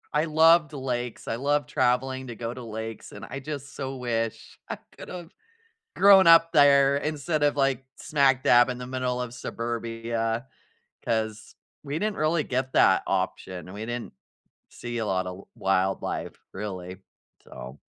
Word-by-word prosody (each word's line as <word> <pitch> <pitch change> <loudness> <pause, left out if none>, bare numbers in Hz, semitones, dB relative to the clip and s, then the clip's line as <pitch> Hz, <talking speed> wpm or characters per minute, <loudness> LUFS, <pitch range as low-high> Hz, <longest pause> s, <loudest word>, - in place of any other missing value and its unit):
I 150 +2 +3
loved 160 0 +4
lakes, 125 -4 -4
I 115 - -1
loved 145 +3 0
traveling 130 +1 0
to 120 - -7
go 115 +1 -5
to 125 - -9
lakes, 110 0 -7
and - - -9
I 140 - -6
just 140 -1 -7
so 135 0 -5
wish 115 -3 -3
I - - -4 0.2
could - - -10
have 175 -1 -8 0.6
grown 195 -3 +7
up 165 0 +7
there 140 -1 +6
instead 150 +1 -2
of 145 0 +3
like 135 -2 +1
smack 135 -3 +2
dab 120 +1 +6
in 125 - -3
the 125 - -7
middle 125 -1 -2
of 125 -1 -4
suburbia 115 0 -3 0.6
'cause 110 -1 -2 0.3
we 145 +2 -3
didn't 210 0 -1
really 155 +1 +1
get 130 0 -2
that 95 -1 +5
option. 95 -1 -3
We 105 +2 -6
didn't 120 0 -5 0.6
see 120 0 -6
a 110 - -2
lot 95 -1 0
of 90 0 -5
w - - -14
wildlife, 95 0 -1 0.2
really. 95 -2 -6 0.5
So 65 +3 -10
125 Hz, 160 wpm, -26 LUFS, 115-145 Hz, 0.6 s, grown